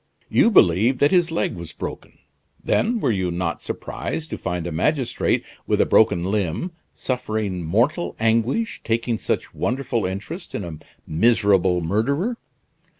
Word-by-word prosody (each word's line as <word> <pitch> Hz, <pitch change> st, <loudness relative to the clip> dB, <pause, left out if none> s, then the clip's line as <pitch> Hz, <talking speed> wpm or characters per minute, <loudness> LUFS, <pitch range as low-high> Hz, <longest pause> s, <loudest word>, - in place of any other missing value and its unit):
You -, -, +4 dB
believed 115 Hz, -, +4 dB
that 145 Hz, -, +3 dB
his 175 Hz, -2 st, +3 dB
leg 165 Hz, -, -1 dB
was 85 Hz, -4 st, -8 dB
broken. -, -, -7 dB, 0.5 s
Then 230 Hz, +1 st, +1 dB
were 125 Hz, -, +1 dB
you 95 Hz, -4 st, 0 dB
not 85 Hz, -3 st, -2 dB
surprised 160 Hz, 0 st, -5 dB
to -, -, -3 dB
find 90 Hz, -2 st, -3 dB
a 85 Hz, -, -3 dB
magistrate, 130 Hz, -, 0 dB, 0.2 s
with -, -, +1 dB
a -, -, +5 dB
broken 100 Hz, -6 st, +4 dB
limb, 105 Hz, -, -1 dB, 0.2 s
suffering 110 Hz, -7 st, -3 dB
mortal 120 Hz, -, +1 dB
anguish, 115 Hz, -, +1 dB
taking 115 Hz, 0 st, 0 dB
such -, -, -2 dB
wonderful 125 Hz, -5 st, -1 dB
interest 105 Hz, -, -6 dB
in 105 Hz, -, -3 dB
a 80 Hz, -3 st, -7 dB, 0.3 s
miserable 95 Hz, -1 st, +3 dB
murderer? 140 Hz, -, 0 dB
110 Hz, 145 wpm, -22 LUFS, 90-140 Hz, 0.5 s, a